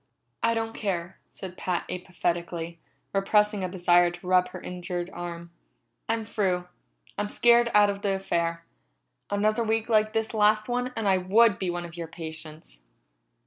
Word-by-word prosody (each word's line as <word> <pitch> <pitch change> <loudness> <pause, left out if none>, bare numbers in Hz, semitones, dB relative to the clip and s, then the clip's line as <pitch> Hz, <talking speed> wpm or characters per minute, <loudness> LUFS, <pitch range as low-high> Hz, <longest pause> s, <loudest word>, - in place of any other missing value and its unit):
"I 230 0 +2
don't 225 0 -2
care," 185 -4 -3
said 185 -1 -9
Pat 180 -2 -2
apathetically, 175 -2 -3 0.3
repressing 210 +1 +2
a 185 - -1
desire 175 -1 +4
to 175 +1 -9
rub 180 0 +4
her - - -8
injured 180 0 -5
arm. 170 -1 -7 0.6
"I'm 225 -1 0
through. 185 -4 -1 0.5
I'm 205 - -1
scared 235 +1 +5
out 205 -1 +6
of 200 0 -7
the 200 -1 +1
affair. 170 -3 -1 0.6
Another 215 +3 +1
week 225 +1 0
like 215 -1 +3
this 225 0 -1
last 215 0 +3
one 245 +1 -1
and 220 -2 0
I 190 -1 +4
would 205 +3 +4
be 185 - -1
one 175 0 -3
of 170 0 -11
your 170 -1 -4
patients." 160 - -8
185 Hz, 160 wpm, -27 LUFS, 175-215 Hz, 0.6 s, out